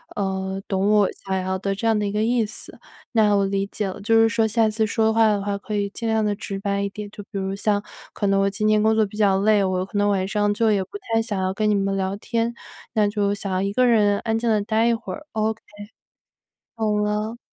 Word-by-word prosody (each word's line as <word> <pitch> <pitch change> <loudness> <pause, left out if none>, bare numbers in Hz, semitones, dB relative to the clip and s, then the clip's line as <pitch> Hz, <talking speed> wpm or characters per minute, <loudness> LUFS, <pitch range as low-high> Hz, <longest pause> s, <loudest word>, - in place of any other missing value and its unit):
呃， 190 -1 -2
懂 195 +1 +1
我 210 -2 +4 0.2
想 190 0 0
要 190 0 -2
的 195 0 -2
这 230 - -5
样 225 -1 +3
的 205 - -1
一 - - -2
个 210 +1 0
意 235 0 +2
思。 210 - -6 0.3
那 215 -3 +3
我 200 -1 +2
理 195 0 -1
解 205 0 -3
了， 190 - -6
就 225 +3 +2
是 225 - +6
说 225 -1 +1
下 225 0 +2
次 215 0 0
说 220 +1 +1
话 225 0 +4
的 210 -1 +2
话 200 0 -1
可 210 - -5
以 200 -1 0
尽 230 +1 -4
量 220 -1 +1
地 210 - +1
直 195 0 -5
白 200 0 -1
一 200 - -1
点， 210 +1 -7
就 205 - -9
比 - - -32
如 195 0 -2
像 205 0 0 0.3
“可 - - -3
能 195 0 +3
我 195 - +2
今 210 +2 -1
天 215 0 +4
工 220 0 +3
作 220 -1 +3
比 200 - -11
较 200 -3 +3
累， 210 -1 +4
我 185 -1 0
可 205 +1 -6
能 205 0 +2
晚 190 -2 0
上 205 +1 +1
就 225 0 +2
也 195 -2 +1
不 - - -18 0.2
太 225 - +4
想 210 -4 -3
要 185 0 -1
跟 215 +2 0
你 210 - +3
们 195 0 0
聊 190 0 -1
天， 230 +2 -1 0.4
那 210 -2 +3
就 205 -1 0
想 200 -1 -5
要 185 0 0
一 200 0 -1
个 255 +4 +3
人 210 -4 +4
安 225 -1 -1
静 235 0 0
地 215 -1 +3
呆 220 +2 +1
一 235 - +3
会 225 - -7
儿 300 - -8
”，OK， 220 0 0 1.2
懂 215 -2 0
了。 210 +2 -2
210 Hz, 290 characters per minute, -23 LUFS, 195-220 Hz, 1.2 s, 是